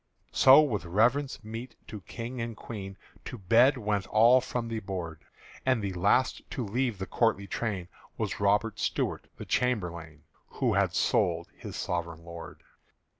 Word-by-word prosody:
So 135 +3 +8
with 120 -10 -1
reverence 115 +10 +1
meet 115 +3 -7
to 105 -2 -8
King 115 +8 -6
and 115 -1 -5
Queen 100 -4 -7 0.3
To - - -6
bed 115 +7 +4
went 105 -4 -1
all 120 +4 +6
from 120 -2 -3
the 115 -1 -3
board; 90 -6 -6 0.4
And 130 -2 +2
the 100 -1 -2
last 100 +8 +2
to 125 - -3
leave 120 +1 -1
the 95 - -4
courtly 115 -3 +1
train 100 -3 -3 0.3
Was - - -3
Robert 105 +2 +1
Stuart - - -1
the - - -7
chamberlain 85 -10 -2 0.3
Who - - +1
had - - +1
sold - - +1
his - - -8
sovereign 85 -1 -4
lord. 85 -1 -10
110 Hz, 155 wpm, -29 LUFS, 95-120 Hz, 0.4 s, So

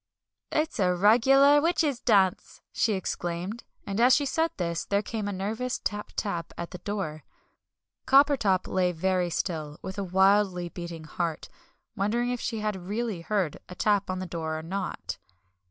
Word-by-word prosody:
"It's 310 -5 -1
a 180 -2 +3
regular 270 +9 +6
witches' 315 -5 +1
dance!" 195 -7 +2
she 225 -3 +2
exclaimed. 185 +3 -3 0.2
And 200 +2 -1
as 250 +2 +7
she 285 - +1
said 320 +4 +1
this, 170 -2 -2
there 200 +1 0
came 215 -1 -4
a - - -2
nervous 220 +6 -2
tap 210 0 -4
tap 175 -5 -3
at 170 - -5
the 180 - -7
door. 180 -6 -4 0.8
Coppertop 265 -9 +4
lay 180 -1 +1
very 180 +1 0
still, 155 -4 -3
with 190 +1 -5
a - - -1
wildly 190 -1 +3
beating 170 -2 -7
heart, 165 +1 -3 0.5
wondering 235 +4 0
if 245 - -3
she 225 -2 -3
had 200 -4 -3
really 215 -3 -2
heard 185 -4 -1
a 180 - -8
tap 205 0 +1
on 185 - -1
the 185 - -4
door 160 -2 -3
or 160 - -6
not. 190 +4 -4
195 Hz, 165 wpm, -27 LUFS, 175-225 Hz, 0.8 s, as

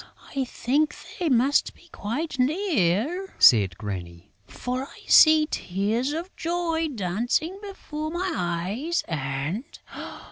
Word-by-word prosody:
"I 270 -1 0
think 285 +5 0 0.2
they 345 -3 +1
must 260 +3 +2
be 345 - -20
quite 270 +7 -4
near," 300 - +1
said 100 -6 +6
Granny, 90 -5 -7 0.2
"for 250 +1 -4
I - - -15
see 310 -1 +7
tears 210 +9 -1
of 335 +5 -5
joy 330 -1 -1
dancing 240 - -1
before 310 -6 -6
my 350 +2 -2
eyes 190 - -1
and...." 145 - -3
260 Hz, 115 wpm, -25 LUFS, -, 0.2 s, see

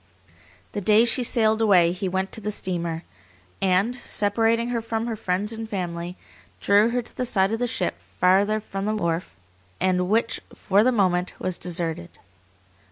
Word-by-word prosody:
The 205 - -4
day 215 +4 +5
she 240 +2 +2
sailed 220 -2 +2
away 180 -6 +5
he 185 +1 -3
went 190 +1 -2
to 220 - -4
the 210 - -3
steamer, 170 -5 -3 0.6
and, 195 +6 +2
separating 230 0 +1
her 235 -1 -1
from 225 0 -3
her 235 -2 -3
friends 205 +1 -2
and 225 0 -5
family, 175 -2 -4 0.4
drew 205 +3 +4
her 245 +1 -1
to - - -15
the 255 - -2
side 200 -4 +1
of 225 - -1
the 245 - 0
ship 185 -6 -2
farther 200 +4 +2
from 195 -2 -5
the 215 +1 0
wharf, 170 - -2 0.4
and 180 -1 +1
which 230 +2 +1
for 200 +2 +2
the 255 - +3
moment, 185 -5 +1
was 185 -1 -3
deserted. 170 -1 -3
200 Hz, 170 wpm, -24 LUFS, 180-225 Hz, 0.6 s, day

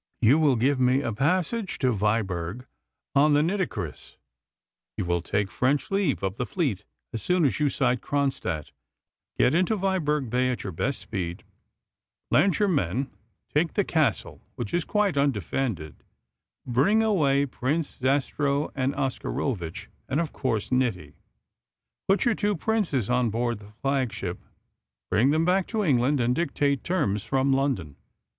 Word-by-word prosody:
You 125 +7 +5
will 145 -4 +4
give 130 +4 +2
me 130 +2 +3
a 115 - -2
passage 185 - 0
to 130 -2 +2
Viborg 105 0 -1 0.5
on 145 +1 +5
the 145 - +4
Nitocris. 185 +1 -3 0.8
You - - -1
will 85 0 0
take 100 +3 -1
French 135 - 0
leave 195 - +1
of 95 +2 -2
the 125 - -1
fleet 140 - -1 0.3
as 115 - -4
soon 180 - +2
as 135 - +1
you 150 -1 +3
sight 125 -2 +1
Kronstadt, 130 - -2 0.7
get - - +4
into 185 +6 +2
Viborg 155 -8 0
Bay 125 +1 +2
at 125 - -3
your 95 - -4
best 135 - -2
speed, 90 -5 -4 0.9
land 155 - +4
your 205 - +2
men, 130 - 0 0.4
take 155 +2 +1
the 205 - +3
Castle, 155 - 0
which 115 -4 -5
is 175 -1 +1
quite 205 -7 +1
undefended, 115 - -1 0.7
bring 140 - +3
away 145 -10 +3
Prince 140 +4 -2
Zastrow 140 +2 0
and 135 0 -1
Oscarovitch, 125 - -3 0.2
and, 135 +3 +1
of 165 -3 -2
course, 115 -6 -2
Niti; 125 -7 0 0.9
put 195 +1 +3
your 240 - +4
two 205 -1 0
princes 170 - 0
on 125 -1 +2
board 120 0 -1
the 105 0 -14
flagship, 130 -10 -1 0.7
bring 120 +6 +4
them 160 +3 +2
back 185 +1 +2
to 220 -2 -1
England, 140 -3 +2
and 120 0 +2
dictate 140 -2 0
terms 140 - 0
from 135 0 +1
London. 130 - -1
135 Hz, 150 wpm, -26 LUFS, 115-160 Hz, 0.9 s, You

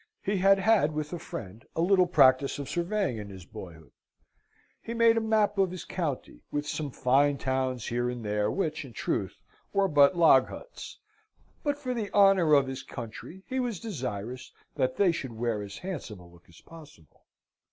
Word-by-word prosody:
He 200 +1 0
had 195 +1 +5
had 195 -6 +3
with 150 +1 -4
a 175 - -4
friend 105 -4 -8
a 165 - 0
little 185 0 +4
practice 135 -5 +4
of 140 -2 -5
surveying 175 - -1
in 105 -1 -7
his 95 -3 -11
boyhood. 80 -7 -11 0.9
He 230 - -6
made 230 -1 +5
a 225 - +1
map 215 -2 +1
of 190 -1 +3
his 185 0 -7
county, 145 - -4
with 145 0 -3
some 150 -1 -3
fine 140 +3 +2
towns 130 -3 -2
here 120 +1 -1
and 120 -2 -6
there, 105 0 0
which, 160 - -2
in 130 -4 -12
truth, 100 -4 -2 0.4
were 200 0 +3
but 145 +1 +5
log 150 -6 +6
huts - - -10 0.6
(but, 290 -1 -1
for 255 -3 -3
the 220 -4 -4
honour 195 -6 +5
of 140 -1 +4
his 130 0 -5
country, 125 - -9
he 260 - -3
was 240 -7 -2
desirous 130 - -5 0.2
that 130 -2 -1
they 195 -3 +4
should 135 -7 -5
wear 115 -2 -1
as 100 -1 -8
handsome 160 - -6
a 90 - -14
look 85 0 -20
as 85 - -17
possible). 150 - -16
145 Hz, 185 wpm, -28 LUFS, 120-195 Hz, 0.9 s, log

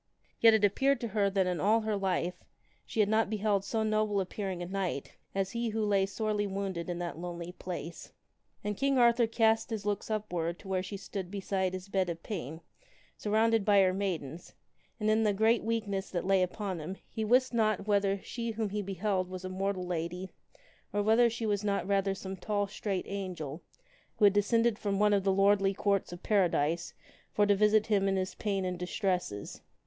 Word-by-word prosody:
Yet 225 -1 +7
it 215 - +1
appeared 270 +7 +2
to 235 - -3
her 200 -1 +2
that 195 -1 +1
in 180 -1 -1
all 220 +3 +3
her 215 -1 -1
life 180 -2 -1 0.4
she 220 - +1
had 205 - +3
not 220 0 +2
beheld 210 -2 +1
so 220 +2 -1
noble 215 -1 +1
appearing 190 -1 -3
a - - -4
knight 185 -6 -3 0.2
as 195 0 0
he 235 0 -1
who 220 0 -1
lay 195 -2 +2
sorely 210 0 -1
wounded 190 -3 -3
in 175 - -2
that 175 -2 -4
lonely 175 0 -5
place. 175 -2 -7 0.5
And 210 0 -2
King 275 +4 +1
Arthur 235 -1 +5
cast 225 -1 +2
his 215 -3 -4
looks 205 0 -2
upward 180 -6 -2
to 195 - -14
where 190 -1 0
she 190 +2 -6
stood 190 -2 -6
beside 190 -1 -1
his 185 +1 -6
bed 190 -2 0
of 165 -1 -5
pain, 160 - -5 0.5
surrounded 220 +1 +2
by 205 0 +5
her 185 -1 +3
maidens, 175 -5 -4 0.4
and 215 - -1
in 215 +1 +3
the 210 -2 +2
great 220 +3 +3
weakness 210 -4 -2
that 175 -1 -3
lay 195 0 +3
upon 185 0 -2
him 180 +5 -6
he 220 - -4
wist 250 +4 +3
not 215 -4 +1
whether 200 -1 +2
she 235 -1 -4
whom 220 -1 -2
he 210 0 -1
beheld 190 -1 -1
was 185 0 -6
a - - -3
mortal 190 0 -2
lady 180 +2 -4 0.6
or 205 0 0
whether 225 +3 +5
she 230 0 -4
was 205 -1 0
not 200 -1 0
rather 195 -1 +1
some 190 0 -6
tall 205 +2 -1
straight 200 -2 -3
angel 180 -6 -5 0.6
who 210 - +5
had 200 - +6
descended 230 +2 +2
from 200 -2 -1
one 210 +1 +4
of 200 -1 +2
the 195 - +3
Lordly 195 0 +3
Courts 200 -2 0
of 175 0 -9
Paradise 170 -5 +1 0.4
for 205 - +3
to 205 - +4
visit 210 +1 +4
him 200 -3 +2
in 195 - +1
his 185 0 -2
pain 195 -3 -2
and 180 -1 -3
distresses. 180 - -2
200 Hz, 200 wpm, -31 LUFS, 185-215 Hz, 0.6 s, Yet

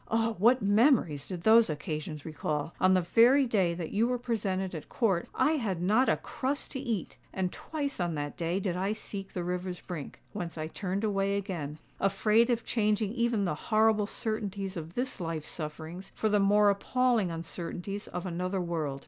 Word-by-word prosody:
Oh! 225 0 +1
what 240 +4 +5
memories 205 - +3
did 180 -3 -6
those 225 -1 +6
occasions 150 0 -4
recall! 155 -1 -3
On 185 0 +5
the 185 - +4
very 240 +10 +5
day 190 -8 +1
that 170 -2 -5
you 225 +3 +2
were 250 0 0
presented 195 -6 -2
at 160 - -7
Court, 195 -7 +1
I 300 - +3
had 200 - -2
not 215 +9 +3
a - - +3
crust 275 +3 -3
to 265 - -4
eat! 230 - -3
And 185 -1 -1
twice 285 -5 -4
on 175 -2 0
that 145 0 -4
day 170 +2 -1
did 185 -3 -1
I 195 +3 0
seek 200 -2 -7
the 180 - -2
river's 180 0 -3
brink, 165 -6 -7
whence 170 -2 -5
I 155 - -2
turned 190 +5 -3
away 200 -1 +1
again—afraid 195 - 0
of 235 -1 0
changing 215 -2 +1
even 235 -4 +1
the 175 - 0 0.2
horrible 215 -1 +4
certainties 205 -3 -3
of 165 0 -7
this 255 +1 -2
life's 165 -2 -3
sufferings 160 +4 -6
for 220 - +1
the 210 0 +3
more 205 +1 +5
appalling 235 0 +1
uncertainties 170 +4 -5
of 180 +1 -5
another 185 +2 -2
world." 160 -6 -2
195 Hz, 180 wpm, -30 LUFS, 170-220 Hz, 0.2 s, those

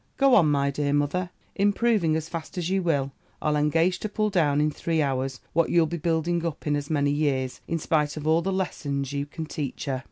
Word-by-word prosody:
Go 275 -1 +4
on, 170 -9 +6
my 140 -1 +2
dear 145 0 -1
mother, 145 +5 0 0.2
improving 205 -4 +2
as 160 0 -2
fast 165 +1 -7
as 175 0 -2
you 195 0 +2
will: 140 -6 0 0.3
I'll 150 -1 0
engage 165 +4 +2
to 215 - -4
pull 215 0 0
down 150 -6 +2
in 150 0 +2
three 165 +2 -1
hours, 135 -2 -1
what 165 -1 +2
you'll 170 -1 +4
be 170 +2 -3
building 165 +1 0
up 165 -3 -4
in 150 -1 +1
as 145 0 -4
many 145 -2 +1
years, 135 -3 -1
in 165 - -1
spite 150 -2 0
of 150 - -5
all 160 +2 +3
the 195 - -1
lessons 140 -7 -2
you 140 0 -2
can 160 +2 -6
teach 150 -3 -5
her.' 135 -2 -1
155 Hz, 225 wpm, -26 LUFS, 145-170 Hz, 0.3 s, on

